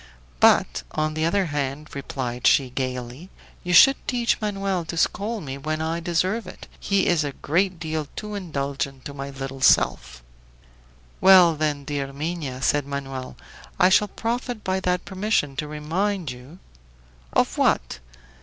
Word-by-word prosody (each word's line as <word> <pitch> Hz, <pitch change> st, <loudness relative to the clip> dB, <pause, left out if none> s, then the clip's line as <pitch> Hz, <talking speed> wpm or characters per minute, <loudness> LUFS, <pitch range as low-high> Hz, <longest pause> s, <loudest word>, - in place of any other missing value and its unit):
"But, -, -, +4 dB
on 155 Hz, 0 st, -1 dB
the 155 Hz, +1 st, -1 dB
other 190 Hz, +3 st, +2 dB
hand," 145 Hz, -1 st, -3 dB
replied 130 Hz, -3 st, -3 dB
she, 130 Hz, -3 st, +4 dB
gayly, 130 Hz, +5 st, -5 dB, 0.3 s
"you 180 Hz, -, -3 dB
should 270 Hz, +10 st, +8 dB
teach 240 Hz, -2 st, 0 dB
Manoel 195 Hz, -3 st, -1 dB
to 170 Hz, -, -6 dB
scold 210 Hz, +4 st, -1 dB
me 135 Hz, -1 st, -6 dB
when 155 Hz, +2 st, -3 dB
I 160 Hz, +1 st, -2 dB
deserve 180 Hz, +5 st, -1 dB
it. -, -, -11 dB
He 195 Hz, -1 st, +1 dB
is 170 Hz, -3 st, +2 dB
a 145 Hz, -1 st, -4 dB
great 180 Hz, +5 st, 0 dB
deal 155 Hz, -2 st, -3 dB
too 210 Hz, 0 st, -6 dB
indulgent 140 Hz, -7 st, -4 dB
to 140 Hz, -, -6 dB
my 140 Hz, 0 st, -6 dB
little 135 Hz, -1 st, -7 dB
self." -, -, +2 dB, 1.0 s
"Well, 185 Hz, -3 st, +8 dB
then, 150 Hz, -2 st, -1 dB
dear 140 Hz, -1 st, -3 dB
Minha," 145 Hz, -3 st, -4 dB
said 145 Hz, -1 st, +1 dB
Manoel, 135 Hz, -2 st, -6 dB, 0.4 s
"I 180 Hz, -1 st, +6 dB
shall 210 Hz, +2 st, +4 dB
profit 235 Hz, +1 st, -3 dB
by 190 Hz, 0 st, 0 dB
that 180 Hz, -1 st, -1 dB
permission 190 Hz, -8 st, -1 dB
to 150 Hz, -, -3 dB
remind 165 Hz, +3 st, -2 dB
you 125 Hz, +7 st, -12 dB, 0.4 s
" -, -, -29 dB
"Of -, -, +1 dB
what?" -, -, +1 dB
155 Hz, 155 wpm, -24 LUFS, 135-185 Hz, 1.0 s, should